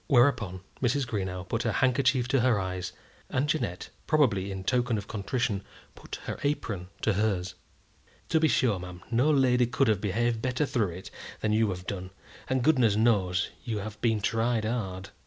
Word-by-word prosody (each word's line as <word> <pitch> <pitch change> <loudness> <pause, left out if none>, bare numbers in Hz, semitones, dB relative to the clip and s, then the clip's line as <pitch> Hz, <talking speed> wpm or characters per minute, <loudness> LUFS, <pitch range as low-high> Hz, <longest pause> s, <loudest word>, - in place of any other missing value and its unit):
Whereupon 120 - +3 0.2
Mrs. 130 +2 +1
Greenow 95 -5 -3
put 115 - -1
her 115 -3 0
handkerchief 130 0 +2
to 135 +1 +3
her 120 -3 +3
eyes, 90 -1 -3 0.4
and 135 +3 0
Jeannette, 145 - -2 0.2
probably 110 - +2
in 95 -1 -5
token 120 +1 +1
of 105 0 -6
contrition, 105 0 -1 0.3
put - - -8
her - - -4
apron 110 -11 -2 0.2
to 110 - +3
hers. 95 -3 0 0.8
"To 160 - +3
be 160 - +4
sure, 115 -9 +2
ma'am, 90 0 -9
no 125 +6 +3
lady 125 -4 +4
could 135 +2 +1
have 105 -3 +2
behaved 115 +3 0
better 130 +4 0
through 120 -8 0
it 90 +2 -9 0.3
than 105 -1 +1
you 110 0 +3
have 90 -1 -5
done, 95 -2 -4 0.4
and 130 -1 +1
goodness 125 -8 +4
knows 100 -5 +2
you 115 -3 -2
have 105 +1 -6
been 110 -3 +2
tried 115 +1 +1
hard." 100 -5 -3
110 Hz, 175 wpm, -28 LUFS, 95-125 Hz, 0.8 s, be